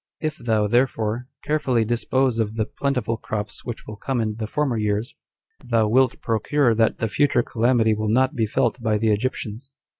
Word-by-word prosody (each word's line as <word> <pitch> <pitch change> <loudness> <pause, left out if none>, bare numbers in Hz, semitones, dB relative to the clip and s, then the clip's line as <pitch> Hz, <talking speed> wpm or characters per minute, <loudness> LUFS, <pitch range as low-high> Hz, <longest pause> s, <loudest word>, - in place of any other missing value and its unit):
If 155 -2 -2
thou, 110 -3 +1
therefore, 120 0 0 0.2
carefully 130 -7 +1
dispose 120 +1 +1
of 110 -1 -1
the 110 -1 0
plentiful 125 -5 -2
crops 110 0 -5
which 120 -2 -6
will 110 - -8
come 130 +4 -2
in 110 -1 -1
the 110 -1 -3
former 140 +1 0
years, 105 +3 -1 0.5
thou 115 -2 +2
wilt 130 +2 +2
procure 120 +3 +2
that 110 0 +2
the 115 - -1
future 135 +1 +2
calamity 115 -1 +2
will 110 0 -2
not 130 +5 +3
be 115 -6 0
felt 120 +1 0
by 110 -2 +1
the 110 0 +2
Egyptians." 120 +2 -3
115 Hz, 180 wpm, -23 LUFS, 110-130 Hz, 0.5 s, not